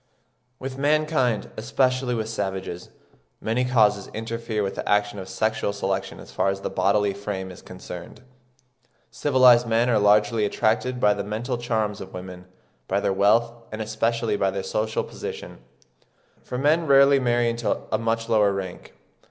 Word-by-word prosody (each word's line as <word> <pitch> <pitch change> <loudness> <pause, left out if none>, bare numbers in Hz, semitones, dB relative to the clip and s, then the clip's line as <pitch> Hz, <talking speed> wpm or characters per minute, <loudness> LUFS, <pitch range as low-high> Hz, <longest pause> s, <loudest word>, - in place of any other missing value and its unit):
With 130 0 -6
mankind, 145 -5 +1
especially 130 +2 0
with 110 -1 -2
savages, 95 -5 -4 0.5
many 115 +3 0
causes 110 -5 +2
interfere 115 -1 -3
with 95 - -2
the - - -5
action 105 0 +1
of 95 0 -8
sexual 110 +1 -1
selection 95 -1 -3
as - - -12
far - - +1
as 95 0 -3
the - - -4
bodily 100 0 +2
frame 95 -2 -5
is 90 - -12
concerned. 90 +2 -10 0.9
Civilised 125 -4 +5
men 115 +2 +2
are 110 - +3
largely 105 +2 +3
attracted 115 +4 0
by 105 -3 +4
the 100 0 -4
mental 120 +4 -3
charms 110 -4 -1
of 95 - -9
women, 90 0 -8 0.4
by 100 - +1
their 100 - 0
wealth, 105 +4 +3 0.2
and 110 - -6
especially 115 +1 -1
by 95 -1 +1
their 95 0 -3
social 110 +1 -1
position; - - -8 0.8
for 125 - -5
men 155 +5 +2
rarely 140 0 +6
marry 120 -2 +1
into 115 -1 -1
a 110 - +1
much 115 0 -1
lower 105 -3 +3
rank. 95 -2 -6
110 Hz, 160 wpm, -24 LUFS, 100-120 Hz, 0.9 s, rarely